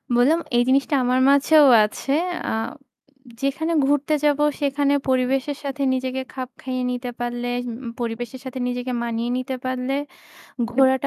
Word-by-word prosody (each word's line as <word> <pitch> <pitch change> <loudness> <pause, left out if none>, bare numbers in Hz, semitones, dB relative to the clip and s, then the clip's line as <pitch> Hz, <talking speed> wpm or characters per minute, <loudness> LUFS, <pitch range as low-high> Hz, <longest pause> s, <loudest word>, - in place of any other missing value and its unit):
বললাম 280 +8 +4 0.2
এই 240 - +5
জিনিসটা 275 +2 +2
আমার 250 +1 +2
মাঝেও 290 +2 +6 0.2
আছে। 270 +6 -3 0.4
আ - - -1 0.9
যেখানে 310 +5 -1
ঘুরতে 290 +2 +2
যাব 295 -1 +3 0.2
সেখানে 285 0 +1 0.2
পরিবেশের 260 +2 +1
সাথে 280 0 -3
নিজেকে 260 0 -2
খাপ 255 -1 -5
খাইয়ে 255 -1 -3
নিতে 250 0 -4
পারলে, 240 0 -3 0.2
উম 235 - -4 0.3
পরিবেশের 240 +2 -4
সাথে 260 0 -6
নিজেকে 250 0 -3
মানিয়ে 235 0 -2
নিতে 255 +1 -3
পারলে 255 +1 -1 0.8
ঘোরাটা 265 +1 +3
260 Hz, 140 wpm, -22 LUFS, 245-275 Hz, 0.9 s, মাঝেও